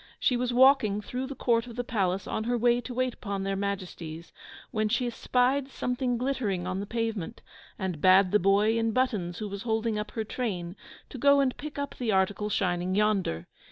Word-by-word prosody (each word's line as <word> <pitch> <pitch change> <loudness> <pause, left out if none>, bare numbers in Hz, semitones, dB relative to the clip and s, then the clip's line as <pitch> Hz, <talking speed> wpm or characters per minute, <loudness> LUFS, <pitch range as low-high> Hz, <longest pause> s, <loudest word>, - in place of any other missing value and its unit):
She 250 - +2
was 245 0 0
walking 245 -5 +5
through 250 +5 -4
the 275 - -6
court 235 -1 +1
of 235 - -9
the 245 - -2
palace 195 -5 -1
on 220 - -3
her 240 +1 +1
way 240 +1 +3
to 250 - -8
wait 255 0 0
upon 200 -4 -4
their 195 0 -1
Majesties, 180 -5 -5 0.4
when 215 -2 0
she 240 +3 +1
spied 255 +3 +1
something 250 -1 -1
glittering 230 -8 -1
on 185 +1 -2
the 200 - -5
pavement, 225 -6 -3 0.3
and 185 -6 -3
bade 185 +1 +6
the 210 - +4
boy 205 +4 +3
in 225 -1 0
buttons, 210 -9 0
who 215 - -4
was 200 0 -6
holding 220 -1 -1
up 210 0 -4
her 220 - -2
train, 195 -7 -4 0.3
to 260 - -8
go 280 +2 +5
and 265 -2 +1
pick 300 0 -8
up 285 -1 -3
the 240 -3 -1
article 200 +2 +1
shining 180 -2 0
yonder. 195 - +1
215 Hz, 200 wpm, -28 LUFS, 195-245 Hz, 0.4 s, bade